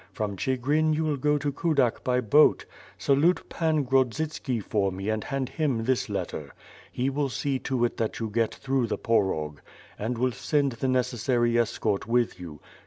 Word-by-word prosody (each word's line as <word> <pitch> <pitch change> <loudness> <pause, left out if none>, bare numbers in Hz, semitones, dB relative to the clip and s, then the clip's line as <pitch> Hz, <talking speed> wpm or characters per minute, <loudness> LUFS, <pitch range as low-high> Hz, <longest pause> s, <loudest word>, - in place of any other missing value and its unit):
From 105 -2 -3
Chigrin 145 +8 +1
you 160 - 0
will 155 -2 0
go 150 +2 +1
to 145 0 -1
Kudak 140 -5 +1
by 125 0 +1
boat. 135 +7 +4 0.3
Salute 150 +6 +2
Pan 160 -3 +1
Grodzitski 130 0 0
for 100 -1 0
me 95 +3 -4
and 110 -1 -1
hand 135 -2 -2
him 140 -8 -1
this 125 -1 0
letter. 85 -7 -4 0.4
He 130 +2 -1
will 140 0 -1
see 135 +1 -1
to 125 -3 0
it 120 - -3
that 110 -1 -2
you 115 - -2
get 115 +1 0
through 135 -3 0
the - - -2
Porog 80 -10 0 0.4
and 115 +3 -2
will 130 +2 +1
send 140 +2 0
the 120 +2 -3
necessary 125 -1 +1
escort 110 -3 -1
with 120 -3 +1
you. 80 -4 -9
125 Hz, 175 wpm, -27 LUFS, 110-140 Hz, 0.4 s, boat